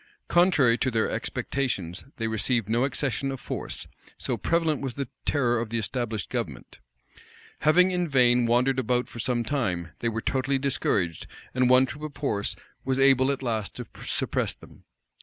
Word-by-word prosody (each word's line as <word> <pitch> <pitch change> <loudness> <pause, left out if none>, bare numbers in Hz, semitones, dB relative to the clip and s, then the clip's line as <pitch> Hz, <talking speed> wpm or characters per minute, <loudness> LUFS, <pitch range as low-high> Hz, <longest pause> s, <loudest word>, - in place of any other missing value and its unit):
Contrary 155 -10 +4
to 130 - +1
their 115 -3 0
expectations, 100 -10 -2
they 115 - -1
received 110 0 0
no 120 +4 +2
accession 135 0 -1
of 135 - -5
force; - - -5 0.3
so - - -1
prevalent 165 -2 +1
was 135 -3 -4
the 140 -2 -3 0.2
terror 120 -5 +2
of 115 -1 -3
the 115 - -1
established 110 -1 -2
government. - - -5 0.8
Having 180 +5 +5
in 180 -1 0
vain 125 -4 +4
wandered 125 +3 +3
about 125 -1 +1
for 120 - -10
some 120 +1 0
time, 95 - -1
they 115 - 0
were 110 0 -2
totally 135 +3 0
discouraged; 100 - 0 0.3
and 125 -1 +3
one 130 +1 +6
troop 145 +3 -8
of 155 -2 -6
horse 105 -8 0 0.3
was 130 0 0
able 135 -1 +5
at 135 -1 -3
last 110 -4 -2
to - - -6 0.2
suppress - - -1
them. - - -17
125 Hz, 170 wpm, -26 LUFS, 115-135 Hz, 0.8 s, one